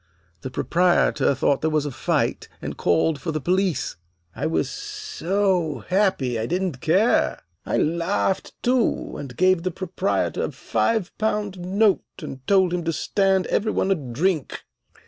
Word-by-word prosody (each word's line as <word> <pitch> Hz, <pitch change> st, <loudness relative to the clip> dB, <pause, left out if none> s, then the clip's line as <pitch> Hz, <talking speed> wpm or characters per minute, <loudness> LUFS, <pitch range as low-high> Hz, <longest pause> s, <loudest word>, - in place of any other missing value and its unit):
The 130 Hz, -, -5 dB
proprietor 170 Hz, -2 st, +2 dB
thought 135 Hz, +1 st, +1 dB
there 160 Hz, -, +1 dB
was 155 Hz, -1 st, +1 dB
a 145 Hz, -, -3 dB
fight, -, -, -1 dB
and -, -, -5 dB
called 140 Hz, -, +1 dB
for 165 Hz, -, -2 dB
the 155 Hz, -, -2 dB
police. 180 Hz, -, 0 dB, 0.4 s
I -, -, -1 dB
was 160 Hz, -, 0 dB
so 200 Hz, -, -1 dB
happy 185 Hz, -, +1 dB
I 110 Hz, -, -2 dB
didn't 180 Hz, -6 st, -2 dB
care. 195 Hz, +9 st, +2 dB, 0.3 s
I -, -, 0 dB
laughed, 170 Hz, +4 st, 0 dB
too, 250 Hz, -1 st, +1 dB
and 130 Hz, -4 st, -8 dB
gave 185 Hz, -1 st, +4 dB
the 185 Hz, -, -1 dB
proprietor 185 Hz, +2 st, -1 dB
a -, -, -5 dB
five 220 Hz, -5 st, -1 dB
pound 210 Hz, -3 st, -1 dB
note, 195 Hz, +3 st, +2 dB, 0.2 s
and 150 Hz, -5 st, -7 dB
told 190 Hz, -3 st, +4 dB
him 175 Hz, -1 st, -1 dB
to 165 Hz, -, +1 dB
stand 190 Hz, +2 st, +1 dB
every 215 Hz, +1 st, 0 dB
one 195 Hz, -, 0 dB
a -, -, +4 dB
drink. 150 Hz, +3 st, -2 dB
180 Hz, 155 wpm, -23 LUFS, 155-195 Hz, 0.4 s, gave